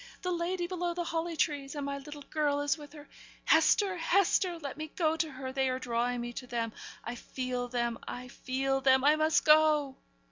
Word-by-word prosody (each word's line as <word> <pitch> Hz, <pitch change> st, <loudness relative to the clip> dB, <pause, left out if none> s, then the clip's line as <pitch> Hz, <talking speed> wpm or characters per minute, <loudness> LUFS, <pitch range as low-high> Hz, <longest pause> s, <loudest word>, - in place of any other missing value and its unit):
the 365 Hz, -, -1 dB
lady 350 Hz, +1 st, -1 dB
below 350 Hz, -1 st, -2 dB
the 350 Hz, -, -1 dB
holly 330 Hz, 0 st, -3 dB
trees; 285 Hz, -3 st, -1 dB
and 290 Hz, -1 st, -3 dB
my 280 Hz, 0 st, -3 dB
little 290 Hz, +1 st, -9 dB
girl 290 Hz, -2 st, +1 dB
is 290 Hz, -1 st, +1 dB
with 295 Hz, -2 st, -12 dB
her. 295 Hz, -1 st, -12 dB, 0.4 s
Hester! 390 Hz, -3 st, +4 dB
Hester! 360 Hz, 0 st, +2 dB
let 285 Hz, -5 st, -6 dB
me 310 Hz, +2 st, -5 dB
go 320 Hz, -2 st, +2 dB
to 320 Hz, 0 st, -1 dB
her; 260 Hz, -1 st, -6 dB
they 265 Hz, -1 st, +1 dB
are 255 Hz, -, -1 dB
drawing 245 Hz, -1 st, -1 dB
me 240 Hz, 0 st, -5 dB
to 250 Hz, -, -7 dB
them. 230 Hz, -2 st, -2 dB, 0.3 s
I 235 Hz, -, -4 dB
feel 250 Hz, 0 st, -4 dB
them 235 Hz, -1 st, -1 dB
I 250 Hz, 0 st, -6 dB
feel 270 Hz, +2 st, -1 dB
them. 265 Hz, 0 st, +4 dB
I 295 Hz, +2 st, +6 dB
must 310 Hz, 0 st, +2 dB
go!' 305 Hz, -3 st, +5 dB
285 Hz, 205 wpm, -31 LUFS, 255-320 Hz, 0.4 s, I